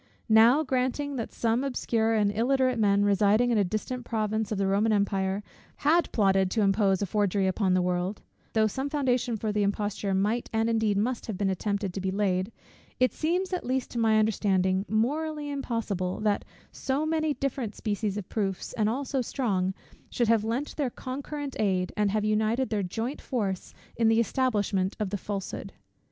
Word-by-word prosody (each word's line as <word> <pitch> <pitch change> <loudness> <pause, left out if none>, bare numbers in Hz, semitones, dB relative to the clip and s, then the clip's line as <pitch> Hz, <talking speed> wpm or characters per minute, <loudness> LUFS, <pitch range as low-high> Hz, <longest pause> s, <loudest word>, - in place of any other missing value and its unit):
Now, 230 +7 +6
granting 265 +1 -1
that 230 - -4
some 230 +2 0
obscure 225 -4 0
and 205 -2 +2
illiterate 255 +1 +2
men, 200 -1 +3
residing 205 +4 +3
in 225 - +3
a - - +4
distant 215 +6 -3
province 220 -2 -1
of 210 - -1
the 195 - +1
Roman 200 +3 +2
empire, 200 -1 0 0.3
had 330 +4 +2
plotted 195 -3 +3
to 215 +2 +1
impose 195 -1 +2
a - - +1
forgery 200 0 +1
upon 190 0 +1
the 185 - +2
world; 180 +3 -2 0.3
though 220 -1 +3
some 265 +6 -2
foundation 255 -5 0
for 215 0 -2
the 210 0 0
imposture 200 -1 -1
might, 210 +5 0
and 225 +1 +1
indeed 220 -3 +1
must, 235 +4 -1
have 215 -4 -4
been 195 -1 +1
attempted 200 0 -2
to 195 - -4
be 190 - -1
laid; 190 0 0 0.5
it 255 0 +3
seems, 360 +4 -1
at 360 - -1
least 255 +1 -2
to 235 - -3
my 220 -1 +4
understanding, 195 -3 +2
morally 295 +7 -1
impossible 225 -9 -2
that 210 -1 +1 0.3
so 275 +3 -1
many 315 -2 0
different 260 -6 -3
species 210 -1 -2
of 205 - -5
proofs, 195 -4 -3
and 215 -1 +1
all 270 +5 -2
so 265 0 -1
strong, 200 -8 0 0.4
should 240 -2 0
have 225 -2 +4
lent 235 +6 -2
their 285 -4 0
concurrent 280 +3 -6
aid, 185 -3 0
and 210 -1 +2
have 210 +1 0
united 220 +4 +1
their 210 -2 +1
joint 225 +9 -3
force 200 -8 -3 0.2
in 230 -1 +2
the 225 0 +4
establishment 210 -6 0
of 210 -3 -2
the - - -1
falsehood. 200 -1 -5
220 Hz, 185 wpm, -27 LUFS, 200-250 Hz, 0.5 s, Now